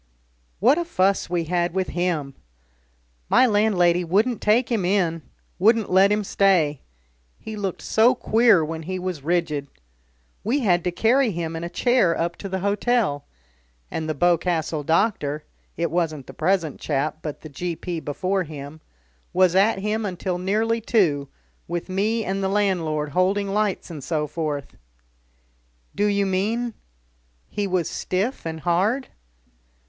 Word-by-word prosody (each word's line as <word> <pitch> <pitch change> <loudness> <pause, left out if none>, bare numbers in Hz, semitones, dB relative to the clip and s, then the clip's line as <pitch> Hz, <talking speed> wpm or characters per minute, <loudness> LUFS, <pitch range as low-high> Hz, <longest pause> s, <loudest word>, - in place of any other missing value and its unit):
What 255 - +4
a - - 0
fuss 200 - +1
we 175 -1 0
had 175 +1 -1
with 190 -1 0
him! 170 -6 -1 1.0
My - - +6
landlady 195 -6 +3
wouldn't 210 +8 +1
take 230 +3 +2
him 220 -5 +1
in, 175 -3 +1 0.4
wouldn't 220 +2 +3
let 190 +2 +5
him 210 0 +1
stay 180 -8 +2 0.6
he 220 - -8
looked 195 -3 -4
so 235 +4 +4
queer 225 -8 +4
when 160 +1 -5
he 185 +4 -4
was 180 -4 -4
rigid. 155 -2 -1 0.8
We 255 +7 0
had 175 -7 +2
to 180 - +1
carry 235 +8 +3
him 165 -4 -3
in 165 - -5
a 170 - -4
chair 215 -3 +2
up 170 +1 -1
to 195 - -7
the 190 0 -3
hotel. 200 - 0 0.7
And 160 -1 -3
the 155 - -1
Boscastle 165 -1 +1
doctor 155 -3 0 0.3
it 170 -2 -1
wasn't 160 -5 -1
the - - -11
present 165 -3 0
chap, 150 +1 -2
but 150 -3 -6
the 155 - -9
G.P. 170 +3 -4
before 185 +6 -1
him 150 -2 -8 0.5
was 185 -1 +4
at 195 +4 +4
him 210 +3 -1
until 185 -2 -3
nearly 220 +5 0
two, 160 - +1 0.4
with 175 +1 -4
me 215 +4 0
and 195 +1 -2
the 190 - +1
landlord 170 -7 0
holding 195 +5 +1
lights 205 -3 -1
and 150 -4 -7
so 155 -1 -1
forth." 150 -2 -4 1.2
"Do 205 +2 +1
you 200 -1 +1
mean 220 +5 -1 0.7
he 205 -1 -2
was 180 -3 0
stiff 195 +2 -2
and 160 -1 -5
hard?" 195 - +1
185 Hz, 150 wpm, -23 LUFS, 165-210 Hz, 1.2 s, My